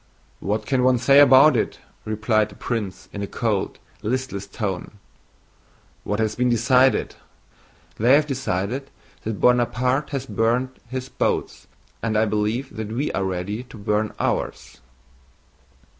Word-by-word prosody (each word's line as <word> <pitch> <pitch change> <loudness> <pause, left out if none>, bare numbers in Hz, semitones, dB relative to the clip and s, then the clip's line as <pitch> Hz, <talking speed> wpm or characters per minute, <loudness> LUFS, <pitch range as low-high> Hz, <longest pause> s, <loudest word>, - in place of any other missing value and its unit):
"What 105 +2 -2
can 130 0 +1
one 130 0 +4
say 135 +3 +5
about 140 +1 +7
it?" 110 - -1 0.3
replied 110 0 +1
the - - -14
prince 105 -6 -4
in 100 - -5
a 100 - -3
cold, 105 -4 -1 0.2
listless 110 -4 -3
tone. 100 -3 -4 1.1
"What 105 - -2
has 110 -1 +1
been 125 +1 +1
decided? 125 +3 +3 0.9
They 120 +5 +6
have 150 +1 +3
decided 130 -1 -2 0.4
that 110 -2 -3
Buonaparte 125 +3 +2
has 135 -3 -3
burnt 125 +2 0
his 130 0 -4
boats, - - -2 0.3
and 110 -2 0
I 110 - +4
believe 110 +6 -1
that 110 -1 -4
we 135 +6 -1
are 95 - -1
ready 95 +4 -3
to 120 - -13
burn 105 +1 0
ours." - - -3
115 Hz, 140 wpm, -23 LUFS, 105-130 Hz, 1.1 s, about